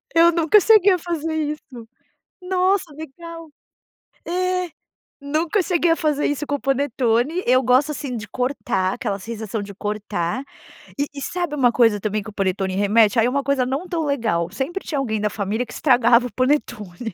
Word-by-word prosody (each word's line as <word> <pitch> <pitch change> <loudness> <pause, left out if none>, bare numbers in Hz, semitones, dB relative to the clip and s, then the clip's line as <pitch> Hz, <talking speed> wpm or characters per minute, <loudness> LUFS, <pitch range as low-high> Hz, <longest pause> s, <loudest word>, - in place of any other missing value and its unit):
Eu 335 +1 +6
nunca 335 +5 +4
cheguei 405 -2 +5
a - - +1
fazer 325 -2 -3
isso. 295 -6 -5 0.5
Nossa, 370 -1 0
legal. 330 +2 -9 0.8
É, 365 0 -1 0.5
nunca 315 +7 0
cheguei 345 -1 +1
a 330 - +4
fazer 300 -3 0
isso 290 +1 -1
com 290 - 0
o - - -4
panetone. 270 +3 0
Eu 255 +1 +4
gosto 260 +5 +3
assim 275 -4 -5
de 205 -2 -6
cortar, 245 -7 -1
aquela 200 0 -3
sensação 220 0 -5
de 200 0 -8
cortar. 210 +2 -3 0.5
E 285 - +1
e 280 - -7
sabe 345 0 -3
uma 250 -4 +3
coisa 225 -4 +3
também 215 0 -2
que 220 - -9
o 215 - -12
panetone 190 -1 -1
remete? 210 +2 +3
Aí 225 - +4
é - - +2
uma 275 +2 -1
coisa 270 -2 +1
não 275 +8 -3
tão 330 -3 -2
legal, 220 -12 0
sempre 280 - -4
tinha 290 -4 -2
alguém 220 -5 -1
da 210 0 0
família 210 +5 -2
que - - -12
estragava 245 -2 +4
o - - -15
panetone. 235 -7 -2
265 Hz, 180 wpm, -21 LUFS, 220-320 Hz, 0.8 s, Eu